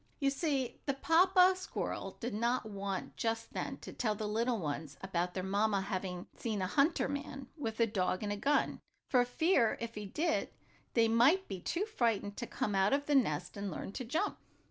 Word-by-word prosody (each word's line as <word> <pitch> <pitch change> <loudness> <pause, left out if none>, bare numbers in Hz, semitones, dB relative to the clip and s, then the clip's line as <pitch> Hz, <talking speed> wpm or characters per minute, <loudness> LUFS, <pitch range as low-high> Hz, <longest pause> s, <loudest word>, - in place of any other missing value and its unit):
You 275 -2 +2
see 275 -4 -1
the 275 - +1
papa 365 +5 +5
squirrel 370 - -4
did 240 -1 -3
not 235 +4 +1
want 200 -2 -4
just 225 0 -2
then - - -3
to - - -8
tell 215 -3 0
the 210 0 -3
little 230 +3 +1
ones 150 -4 -4
about 180 -2 -2
their 185 - -2
mamma 200 +1 +2
having 185 -2 -3
seen 220 -3 -2
a 185 - 0
hunter 285 - +2
man, 275 -1 -5
with 230 -8 -4
a 230 - +6
dog 190 -3 0
and 205 -1 -2
gun, 290 +4 +2 0.3
for 250 -2 +5
fear, 245 -2 +2
if 230 0 -4
he 210 -2 -6
did, 320 - 0 0.5
they 230 -1 +5
might 260 +12 +4
be 190 -2 -5
too 350 - -1
frightened 225 - 0
to 240 - -4
come 210 - -2
out 195 +3 +3
of 285 +1 +1
the 295 - +1
nest 180 - +2
and 200 0 -3
learn 185 - -5
to 255 - -5
jump. 315 - -1
225 Hz, 195 wpm, -33 LUFS, 200-275 Hz, 0.5 s, a